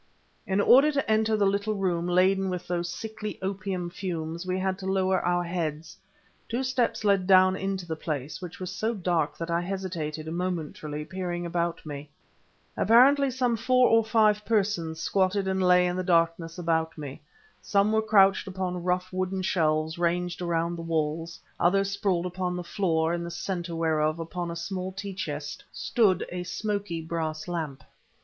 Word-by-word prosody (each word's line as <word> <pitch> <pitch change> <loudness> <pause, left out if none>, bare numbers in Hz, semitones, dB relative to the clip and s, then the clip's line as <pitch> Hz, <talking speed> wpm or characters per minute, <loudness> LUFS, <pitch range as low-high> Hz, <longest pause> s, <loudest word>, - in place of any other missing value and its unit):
In 190 +1 +1
order 270 +8 +6
to 280 - 0
enter 220 0 +2
the 205 - +3
little 200 +2 0
room 180 -3 0
laden 190 +2 +3
with 180 -1 -4
those 175 -1 -1
sickly 215 +1 -6
opium 190 -2 -3
fumes 170 -2 -4
we 185 0 0
had 190 0 -1
to 190 - -5
lower 190 -1 +2
our 175 0 +1
heads. 165 -1 -3 0.5
Two 240 +3 -1
steps 255 -4 0
led 200 -3 +2
down 185 -1 +6
into 195 -1 -3
the 160 -1 -3
place, 150 -1 -4
which 180 -2 -8
was 185 -1 -4
so 220 +5 -1
dark 170 -6 0
that 165 0 -4
I 170 +1 +1
hesitated, 175 -5 -4
momentarily, 160 -3 -4
peering 175 -1 -4
about 170 -1 -2
me. 145 -1 -7 0.7
Apparently 270 +6 +5
some 250 -2 0
four 250 +1 +4
of 225 - -3
five 215 -2 +3
persons 195 -7 0
squatted 190 +2 +1
and 190 0 0
lay 180 0 +5
in 180 0 0
the 185 - -1
darkness 165 -1 +1
about 165 -2 0
me. 145 -3 -7 0.4
Some 200 +1 +2
were 220 0 +3
couched 200 -2 +4
upon 185 -2 -3
rough 180 +1 -1
wooden 185 0 -1
shelves 160 -2 +1
ranged 175 +1 0
around 170 0 -1
the - - -5
walls, 165 0 -2 0.2
others 195 +2 +3
sprawled 190 -3 0
upon 180 0 -2
the 180 - -4
floor, 170 -3 0
in 170 0 -2
the 170 - -5
center 175 -1 -4
whereof, 155 -1 +1
upon 170 +1 -4
a 170 - -4
small 185 +2 -4
tea 195 +1 -6
chest, 150 -5 -5
stood 205 -7 +2
a 180 0 -4
smoky 200 -2 -3
brass 160 -1 -3
lamp. 155 -7 -4
180 Hz, 170 wpm, -27 LUFS, 165-195 Hz, 0.7 s, order